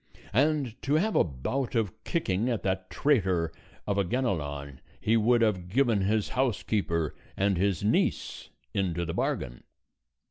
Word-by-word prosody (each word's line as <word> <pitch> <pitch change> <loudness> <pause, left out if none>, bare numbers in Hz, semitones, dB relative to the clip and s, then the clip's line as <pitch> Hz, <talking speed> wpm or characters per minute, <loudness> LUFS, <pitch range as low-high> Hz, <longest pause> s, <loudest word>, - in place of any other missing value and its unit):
And 140 -2 +1
to 145 +2 +1
have 205 +7 +1
a - - +6
bout 105 - -3
of 110 -6 -1
kicking 115 - 0
at 115 -7 -1
that 95 -1 -1
traitor 95 - +2 0.3
of 100 -1 0
a - - +3
Ganelon 75 - -2 0.2
he 110 - +2
would 115 +1 +4
have 95 -5 0
given 115 -1 +2
his 105 +2 +1
housekeeper, 100 - 0 0.2
and 100 0 +2
his 95 0 0
niece 105 - 0 0.2
into 85 -3 0
the 85 - -3
bargain. - - -2
100 Hz, 145 wpm, -28 LUFS, 90-125 Hz, 0.3 s, a